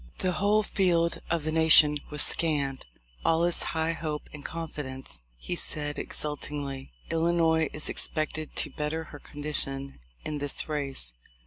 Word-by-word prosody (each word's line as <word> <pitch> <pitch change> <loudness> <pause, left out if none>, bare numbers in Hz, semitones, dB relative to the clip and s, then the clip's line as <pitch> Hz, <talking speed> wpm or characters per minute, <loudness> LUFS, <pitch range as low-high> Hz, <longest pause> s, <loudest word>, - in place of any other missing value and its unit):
"The 185 - 0
whole 205 +5 +2
field 175 -5 +1
of 170 -2 0
the 155 - -1
nation 155 -2 +7
was 150 -1 +2
scanned; 140 - +1 0.4
all 165 +1 +3
is 175 - +4
high 160 0 0
hope 155 -2 -5
and 150 -1 -9
confidence," 135 - -6 0.2
he 175 - -4
said 145 -3 0
exultingly. 145 - -3 0.2
"Illinois 165 -1 +2
is 150 - -2
expected 155 0 -1
to - - +1
better 150 +2 -3
her 145 - -8
condition 140 -2 -2 0.3
in 150 -1 -3
this 145 -1 -1
race. 140 - -2
155 Hz, 140 wpm, -28 LUFS, 145-165 Hz, 0.4 s, nation